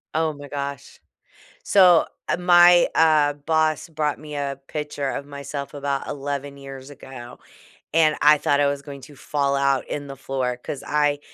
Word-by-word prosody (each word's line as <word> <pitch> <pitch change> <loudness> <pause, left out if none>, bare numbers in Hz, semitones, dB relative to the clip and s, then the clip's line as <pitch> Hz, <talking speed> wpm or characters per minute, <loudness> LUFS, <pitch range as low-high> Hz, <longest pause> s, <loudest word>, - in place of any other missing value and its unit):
Oh 160 -1 +1
my 145 0 -11
gosh. 140 -1 -6 0.6
So, 180 -4 +5 0.2
ah, - - +1
my, 175 0 +6
uh, 155 -2 +4
boss 155 +1 0
brought 150 -2 -2
me 150 0 -9
a 140 -1 -3
picture 150 -2 -4
of 140 - -5
myself 140 -1 -7
about 140 -1 -3
11 140 0 -5
years 135 -1 -10
ago, 130 -3 -11 0.6
and 155 -1 +4
I 150 +1 +6
thought 145 0 +1
I 145 - +3
was 140 0 -2
going 140 -1 -10
to 145 +3 -14
fall 140 0 -1
out 140 -1 +1
in 145 -1 -5
the 135 - -8
floor 130 -2 -3
'cause 140 - -6
I 145 -1 +1
145 Hz, 170 wpm, -23 LUFS, 140-150 Hz, 0.6 s, my